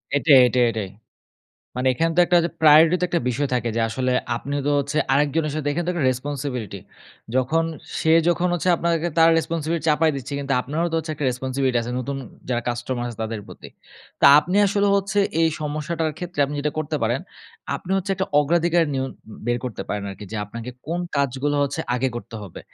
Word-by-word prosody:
এটাই, 145 Hz, -1 st, +6 dB
এটাই, 125 Hz, +1 st, +2 dB
এটাই। 105 Hz, -4 st, -4 dB, 0.9 s
মানে 125 Hz, +1 st, -1 dB
এখানে 165 Hz, +6 st, 0 dB
তো -, -, +6 dB
একটা 175 Hz, -, +3 dB
ওইযে 170 Hz, 0 st, -1 dB
priority 155 Hz, +2 st, +7 dB
তো 180 Hz, -, +2 dB
একটা 175 Hz, -1 st, 0 dB
বিষয় 140 Hz, +3 st, -1 dB
থাকে 120 Hz, -1 st, 0 dB
যে 115 Hz, -, +1 dB
আসলে 125 Hz, +3 st, -1 dB, 0.2 s
আপনিও 140 Hz, +3 st, -3 dB
তো -, -, +2 dB
হচ্ছে 145 Hz, +2 st, -1 dB
আরেকজনের 150 Hz, +2 st, +1 dB
সাথে 150 Hz, -2 st, -2 dB
এখানে 170 Hz, +3 st, -2 dB
তো -, -, +1 dB
একটা 160 Hz, -6 st, -1 dB
responsibility 125 Hz, -6 st, -4 dB, 0.5 s
যখন 145 Hz, +6 st, +2 dB, 0.4 s
সে 160 Hz, -, +3 dB, 0.2 s
যখন 175 Hz, +1 st, +1 dB
হচ্ছে 175 Hz, +2 st, -1 dB
আপনাকে 170 Hz, 0 st, 0 dB
তার 165 Hz, 0 st, +7 dB
responsibility 165 Hz, -1 st, -2 dB
চাপায় 155 Hz, 0 st, +3 dB
দিচ্ছে, 135 Hz, +1 st, -7 dB
কিন্তু 140 Hz, -1 st, -3 dB
আপনারও 155 Hz, +7 st, -2 dB
তো -, -, +1 dB
হচ্ছে 160 Hz, -1 st, -4 dB
একটা 145 Hz, -1 st, -4 dB
responsibility 130 Hz, 0 st, -1 dB
আছে, 120 Hz, -, -5 dB
নতুন 135 Hz, +2 st, -4 dB, 0.3 s
যারা 120 Hz, -1 st, -1 dB
কাস্টমার 120 Hz, +1 st, -3 dB
আছে 115 Hz, -2 st, -9 dB
তাদের 110 Hz, -1 st, -4 dB
প্রতি। -, -, -12 dB, 0.5 s
তা -, -, +7 dB
আপনি 180 Hz, +5 st, -2 dB
আসলে 200 Hz, +1 st, +1 dB
হচ্ছে 200 Hz, +1 st, 0 dB, 0.2 s
এই 165 Hz, -, +4 dB
সমস্যাটার 155 Hz, +2 st, -2 dB
ক্ষেত্রে 175 Hz, -4 st, -4 dB
আপনি 145 Hz, +1 st, -5 dB
যেটা 150 Hz, 0 st, -1 dB
করতে 155 Hz, 0 st, -2 dB
পারেন, 120 Hz, +4 st, +1 dB, 0.6 s
আপনি 180 Hz, -, -11 dB
হচ্ছে 195 Hz, +1 st, -2 dB
একটা 190 Hz, 0 st, -2 dB
অগ্রাধিকার 170 Hz, +2 st, +2 dB
নিয়ন 130 Hz, 0 st, -2 dB, 0.4 s
বের 120 Hz, 0 st, +1 dB
করতে 110 Hz, -6 st, -4 dB
পারেন 105 Hz, -1 st, -2 dB
আরকি। 95 Hz, +2 st, -9 dB
যে 110 Hz, -, -3 dB
আপনাকে 115 Hz, +4 st, -7 dB, 0.2 s
কোন 170 Hz, +2 st, -2 dB, 0.2 s
কাজগুলো 140 Hz, +1 st, 0 dB
হচ্ছে 140 Hz, +3 st, -2 dB
আগে 130 Hz, +2 st, 0 dB
করতে 120 Hz, -, -9 dB
হবে? 95 Hz, -, -9 dB
145 Hz, 195 wpm, -22 LUFS, 125-165 Hz, 0.9 s, priority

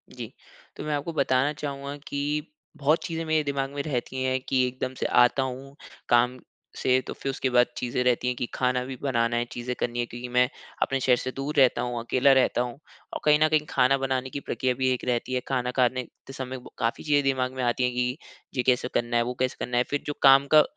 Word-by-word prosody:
जी, -, -, -7 dB, 0.4 s
तो -, -, -7 dB
मैं 150 Hz, -1 st, -2 dB
आपको 145 Hz, +4 st, -3 dB
बताना 135 Hz, 0 st, +2 dB
चाहूँगा 140 Hz, -1 st, -5 dB
कि 145 Hz, +2 st, -2 dB, 0.3 s
बहुत 150 Hz, +3 st, +2 dB
चीज़ें 165 Hz, -1 st, -3 dB
मेरे 155 Hz, -1 st, +2 dB
दिमाग़ 140 Hz, -1 st, -2 dB
में 140 Hz, 0 st, -3 dB
रहती 130 Hz, -2 st, -3 dB
हैं 130 Hz, 0 st, +1 dB
कि 130 Hz, -1 st, +3 dB
एकदम 130 Hz, +1 st, -4 dB
से -, -, -1 dB
आता 125 Hz, +2 st, +4 dB
हूँ 135 Hz, +2 st, -6 dB, 0.3 s
काम 125 Hz, +1 st, +3 dB, 0.4 s
से, 130 Hz, 0 st, +3 dB
तो -, -, -7 dB
फिर 135 Hz, -, -5 dB
उसके 135 Hz, -1 st, -1 dB
बाद 125 Hz, 0 st, +4 dB
चीज़ें 125 Hz, 0 st, -1 dB
रहती 125 Hz, 0 st, +1 dB
हैं 125 Hz, -, 0 dB
कि 120 Hz, -, -2 dB
खाना 125 Hz, 0 st, +1 dB
भी 130 Hz, 0 st, -6 dB
बनाना 120 Hz, -3 st, +1 dB
है, 120 Hz, -, 0 dB
चीज़ें 125 Hz, +1 st, -4 dB
करनी 120 Hz, 0 st, -2 dB
हैं, 120 Hz, -, 0 dB
क्योंकि 120 Hz, +1 st, -7 dB
मैं 125 Hz, +1 st, +3 dB, 0.3 s
अपने 135 Hz, 0 st, +1 dB
शहर 125 Hz, -1 st, +4 dB
से 130 Hz, -, -4 dB
दूर 140 Hz, +2 st, -4 dB
रहता 130 Hz, -2 st, +5 dB
हूँ, 120 Hz, -1 st, -2 dB
अकेला 130 Hz, +4 st, +3 dB
रहता 130 Hz, -2 st, +3 dB
हूँ। 125 Hz, +3 st, -4 dB, 0.3 s
और -, -, -3 dB
कहीं 150 Hz, 0 st, +5 dB
न -, -, +5 dB
कहीं 155 Hz, -1 st, +2 dB
खाना 135 Hz, +2 st, +3 dB
बनाने 130 Hz, -1 st, -1 dB
की 140 Hz, -, -5 dB
प्रक्रिया 130 Hz, -2 st, -1 dB
भी 130 Hz, +1 st, 0 dB
एक 125 Hz, -, -5 dB
रहती 125 Hz, +1 st, -1 dB
है, 125 Hz, -, +1 dB
खाना 125 Hz, -2 st, -1 dB
खाने 125 Hz, 0 st, +1 dB, 0.2 s
ते 135 Hz, -, -9 dB
समय 130 Hz, -1 st, -5 dB, 0.2 s
काफ़ी 115 Hz, -1 st, -1 dB
चीज़े 145 Hz, -1 st, +3 dB
दिमाग़ 130 Hz, -2 st, 0 dB
में 130 Hz, -1 st, -3 dB
आती 120 Hz, +1 st, +1 dB
हैं 125 Hz, -, +2 dB
कि 125 Hz, +3 st, -1 dB, 0.4 s
ये 125 Hz, -, +2 dB
कैसे 125 Hz, -1 st, +2 dB
करना 120 Hz, 0 st, 0 dB
है, 120 Hz, -, +3 dB
वो 125 Hz, +1 st, -3 dB
कैसे 130 Hz, 0 st, 0 dB
करना 120 Hz, 0 st, -2 dB
है। 125 Hz, -, +4 dB
फिर 145 Hz, -, -2 dB
जो 145 Hz, -, -1 dB
काम 135 Hz, 0 st, +7 dB
का 155 Hz, -, +9 dB
130 Hz, 235 wpm, -26 LUFS, 125-140 Hz, 0.4 s, का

